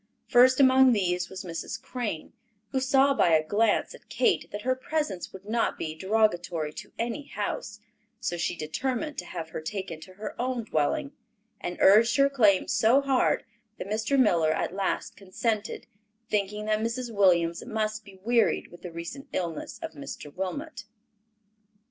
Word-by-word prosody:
First 255 +2 +6
among 260 -1 +6
these 180 -4 0
was 190 +1 -7
Mrs. 175 +6 -5
Crane, 235 -9 -5 0.4
who 265 - +1
saw 270 +1 +4
by 170 -11 +4
a 155 0 +2
glance 210 +5 +1
at - - -16
Kate 415 -5 +1
that 205 0 -6
her 255 - +2
presence 260 - -3
would 190 +1 -12
not 230 +2 0
be 155 - -4
derogatory 175 -4 0
to - - -9
any 235 +5 -3
house, - - -4 0.4
so 175 - -2
she 175 +1 -1
determined 255 - -3
to - - -6
have 165 -2 -6
her - - -5
taken 170 -1 -5
to 185 +2 -12
her 210 +3 -6
own 250 -1 -1
dwelling, 155 - 0 0.5
and 175 - -5
urged 225 +4 +6
her 275 0 +4
claim 210 -8 +4
so 230 +5 +4
hard 270 -2 +2 0.3
that - - -5
Mr. 220 +6 0
Miller 170 -10 +4
at 160 - -1
last 195 0 -2
consented, 205 +2 -3 0.5
thinking 210 0 -1
that 215 0 +1
Mrs. 230 +1 -3
Williams 175 -4 +3
must 215 -2 -2
be 195 -2 -15
wearied 235 +1 +2
with 175 - -14
the 180 - -7
recent 170 +12 -7
illness 170 -4 -3
of - - -4
Mr. 145 0 -8
Wilmot. 230 - -5
210 Hz, 165 wpm, -27 LUFS, 175-250 Hz, 0.5 s, First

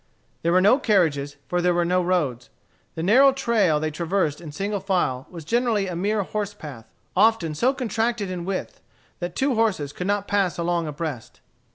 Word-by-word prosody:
There 170 - +1
were 185 +1 +4
no 210 +8 +5
carriages, 155 - +1
for 175 0 0
there 175 0 +2
were 175 0 +2
no 180 +1 +2
roads. 155 -10 -1 0.5
The 160 - -3
narrow 260 +9 +6
trail 225 - +2
they 155 0 -2
traversed 165 -1 -1
in 160 -3 -8
single 200 +6 -2
file 180 -10 -1
was 165 -4 -9
generally 230 0 +1
a 180 -2 -4
mere 205 +4 0
horse 205 +1 -4
path, 135 - -10 0.2
often 220 -8 +3
so 245 - +2
contracted 230 -5 -2
in 180 -2 -4
width 190 +1 -4 0.4
that 175 0 -5
two 270 0 +1
horses 200 - 0
could 180 - -4
not 205 0 0
pass 195 -3 +1
along 170 -1 -1
abreast. 150 -5 -6
180 Hz, 185 wpm, -24 LUFS, 160-210 Hz, 0.5 s, narrow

